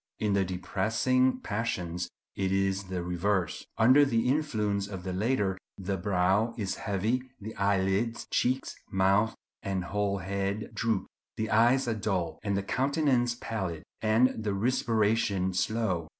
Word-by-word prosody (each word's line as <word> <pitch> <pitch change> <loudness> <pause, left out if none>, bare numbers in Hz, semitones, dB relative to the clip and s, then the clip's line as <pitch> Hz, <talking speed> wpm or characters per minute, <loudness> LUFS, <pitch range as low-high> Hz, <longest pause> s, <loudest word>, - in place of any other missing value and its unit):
In 105 -2 0
the 100 -1 +3
depressing 110 +8 +1
passions 90 -5 -2 0.3
it 95 -1 -1
is 95 0 +1
the 90 -1 -3
reverse." 90 +1 -1
Under 130 +6 +6
the 120 -3 +1
influence 110 -9 0
of 95 -3 -7
the 95 -1 -3
latter 100 -2 0 0.2
the 100 0 -2
brow 100 +4 +1
is 100 -4 -1
heavy, 105 +7 -1 0.2
the 110 +2 -7
eyelids, 100 +3 +1
cheeks, 130 +2 0 0.2
mouth, 100 +3 +3 0.3
and 95 -4 -2
whole 100 +2 -1
head 100 +2 -3
droop; 115 -4 0 0.3
the 110 0 -2
eyes 120 +4 +4
are 115 - +1
dull; 95 -7 -2
the 100 -2 0
countenance 130 0 +1
pallid, 95 -8 -4 0.2
and 110 +1 +3
the 105 -2 -1
respiration 110 -4 +1
slow. 95 -4 0
100 Hz, 135 wpm, -29 LUFS, 95-115 Hz, 0.3 s, Under